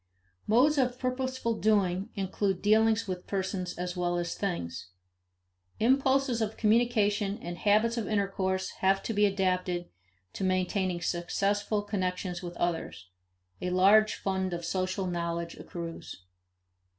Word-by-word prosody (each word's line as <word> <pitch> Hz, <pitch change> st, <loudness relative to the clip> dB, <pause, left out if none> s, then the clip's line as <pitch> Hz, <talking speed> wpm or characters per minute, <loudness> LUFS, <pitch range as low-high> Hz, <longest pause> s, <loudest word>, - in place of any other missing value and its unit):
Modes 275 Hz, +7 st, +4 dB
of 250 Hz, -1 st, +1 dB
purposeful 255 Hz, -3 st, -2 dB
doing 200 Hz, -2 st, +2 dB
include 195 Hz, -1 st, -1 dB
dealings 220 Hz, +1 st, +3 dB
with 180 Hz, -1 st, -5 dB
persons 190 Hz, -2 st, -3 dB
as 180 Hz, +1 st, -3 dB
well 175 Hz, -1 st, 0 dB
as 175 Hz, -1 st, -2 dB
things. 90 Hz, -, -4 dB, 0.9 s
Impulses 265 Hz, 0 st, +2 dB
of 220 Hz, 0 st, -2 dB
communication 215 Hz, -3 st, +2 dB
and 175 Hz, +1 st, -6 dB
habits 215 Hz, +5 st, +2 dB
of 220 Hz, -4 st, -2 dB
intercourse 190 Hz, -2 st, -1 dB
have 195 Hz, +1 st, +3 dB
to 225 Hz, -, -2 dB
be 205 Hz, 0 st, +4 dB
adapted 185 Hz, -2 st, -1 dB, 0.4 s
to -, -, -4 dB
maintaining 185 Hz, -1 st, 0 dB
successful 200 Hz, +5 st, 0 dB
connections 185 Hz, -3 st, -2 dB
with 175 Hz, -1 st, -7 dB
others; 165 Hz, -, -3 dB, 0.5 s
a 180 Hz, -, -1 dB
large 200 Hz, +4 st, +5 dB
fund 190 Hz, -2 st, -2 dB
of 170 Hz, -1 st, -4 dB
social 185 Hz, +2 st, -1 dB
knowledge 170 Hz, -1 st, -3 dB
accrues. 165 Hz, -, -7 dB
195 Hz, 125 wpm, -29 LUFS, 180-215 Hz, 0.9 s, large